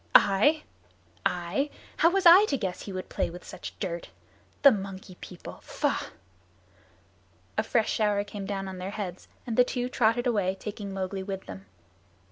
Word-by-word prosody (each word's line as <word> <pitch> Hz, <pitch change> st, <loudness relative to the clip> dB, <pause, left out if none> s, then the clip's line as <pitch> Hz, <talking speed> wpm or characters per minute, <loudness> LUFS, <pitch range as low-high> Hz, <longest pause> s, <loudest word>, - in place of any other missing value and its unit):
"I 290 Hz, +11 st, +6 dB, 0.6 s
I? 180 Hz, +11 st, -1 dB, 0.3 s
How 335 Hz, -, +6 dB
was 390 Hz, +1 st, +1 dB
I 355 Hz, +5 st, +10 dB
to 280 Hz, -, 0 dB
guess 190 Hz, -6 st, -3 dB
he 200 Hz, -, -7 dB
would 185 Hz, -1 st, -5 dB
play -, -, -1 dB
with 175 Hz, +1 st, -10 dB
such -, -, -8 dB
dirt. 170 Hz, -4 st, -4 dB, 0.5 s
The 280 Hz, -, +10 dB
Monkey 195 Hz, -3 st, -5 dB
People! 180 Hz, -, -9 dB
Faugh!" -, -, -1 dB, 1.5 s
A -, -, +3 dB
fresh 225 Hz, -2 st, +1 dB
shower 210 Hz, -2 st, +2 dB
came 205 Hz, -1 st, -7 dB
down 195 Hz, -1 st, -3 dB
on 190 Hz, -1 st, -6 dB
their 185 Hz, +1 st, -4 dB
heads 195 Hz, -4 st, -5 dB, 0.2 s
and 230 Hz, -3 st, -3 dB
the 250 Hz, -, +8 dB
two 245 Hz, 0 st, -2 dB
trotted 240 Hz, 0 st, +2 dB
away, 200 Hz, -6 st, +1 dB
taking 205 Hz, -1 st, -6 dB
Mowgli 190 Hz, 0 st, -3 dB
with 190 Hz, 0 st, -5 dB
them. 95 Hz, 0 st, -9 dB
200 Hz, 165 wpm, -28 LUFS, 185-240 Hz, 1.5 s, I